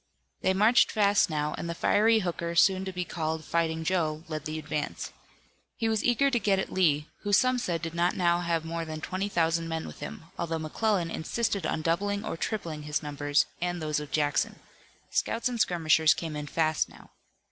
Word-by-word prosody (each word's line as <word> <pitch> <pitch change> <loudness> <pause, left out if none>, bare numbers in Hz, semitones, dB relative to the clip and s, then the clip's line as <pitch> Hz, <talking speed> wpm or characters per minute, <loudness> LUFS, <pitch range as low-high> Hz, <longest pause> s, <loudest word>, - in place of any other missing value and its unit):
They 190 - +2
marched 220 +6 +5
fast 205 -2 +3
now, 150 -1 -1
and 170 - -4
the 170 - -3
fiery 220 +5 +3
Hooker 170 -2 -3
soon 190 +2 +4
to 190 - -3
be 180 -1 -3
called 160 -2 -3
Fighting 160 -1 0
Joe 160 -3 0
led 155 -2 -5
the 155 0 -3
advance. 150 -1 -4 0.6
He 225 - 0
was 220 -1 +1
eager 275 +3 +3
to 240 - +2
get 200 -3 +2
at 190 - -3
Lee, 150 -5 +3 0.2
who 205 - -3
some 250 +5 +4
said 170 -7 -2
did 165 0 -4
not 175 +1 +1
now 175 -2 +2
have 170 -2 -1
more 165 0 -3
than 155 -1 -6
twenty 190 +5 -3
thousand 165 -2 +1
men 160 0 -3
with - - -9
him, - - -7 0.2
although 165 -1 -1
McClellan 170 +3 0
insisted 200 0 -1
on 155 - -2
doubling 200 +5 0
or - - -3
tripling 165 -5 -3
his 150 +1 -2
numbers 145 0 +1 0.2
and 175 0 -1
those 155 -2 -1
of 150 -1 -7
Jackson. 145 -1 0 0.5
Scouts 230 - 0
and 245 -2 -3
skirmishers 160 -2 +4
came 160 -2 -5
in 150 0 -5
fast 155 +1 +1
now. - - -16
170 Hz, 200 wpm, -28 LUFS, 155-195 Hz, 0.6 s, marched